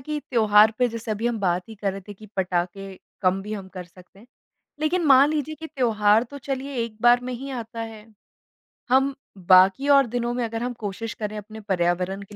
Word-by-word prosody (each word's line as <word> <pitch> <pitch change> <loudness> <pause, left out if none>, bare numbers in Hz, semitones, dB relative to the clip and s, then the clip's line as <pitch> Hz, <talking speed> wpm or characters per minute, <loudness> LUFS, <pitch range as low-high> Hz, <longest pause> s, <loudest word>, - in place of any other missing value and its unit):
कि 300 +3 -4
त्योहार 215 -2 +5
पे 250 - +3
जैसे 230 -1 -6
अभी 215 +2 -2
हम 240 -2 -1
बात 180 +1 -1
ही 220 - -9
कर 200 -2 -2
रहे 195 - -7
थे 205 - -7
कि 215 +3 -14
पटाखे 190 +1 -2 0.3
कम 185 +1 +2
भी 210 +1 -7
हम 195 -3 -6
कर 185 -1 -8
सकते 180 +2 -19
हैं, 225 - -17 0.5
लेकिन 325 +2 0
मान 275 +1 +6
लीजिए 310 0 -2
कि 320 +2 -8
त्योहार 225 -5 +2
तो 280 +4 -10
चलिए 275 +1 -5
एक 220 -2 -8
बार 240 +1 +5
में 250 0 -4
ही 270 +3 -7
आता 230 -3 -6
है। 220 -1 -8 0.8
हम 270 +2 +3 0.3
बाकी 190 +9 +6
और 275 -2 +6
दिनों 240 +1 -2
में 245 -1 -2
अगर 225 +1 -4
हम 245 0 -3
कोशिश 220 +2 -5
करें 210 -1 -5
अपने 215 +1 -9
पर्यावरण 185 0 -1
के 205 +1 -14
220 Hz, 215 wpm, -24 LUFS, 195-250 Hz, 0.8 s, मान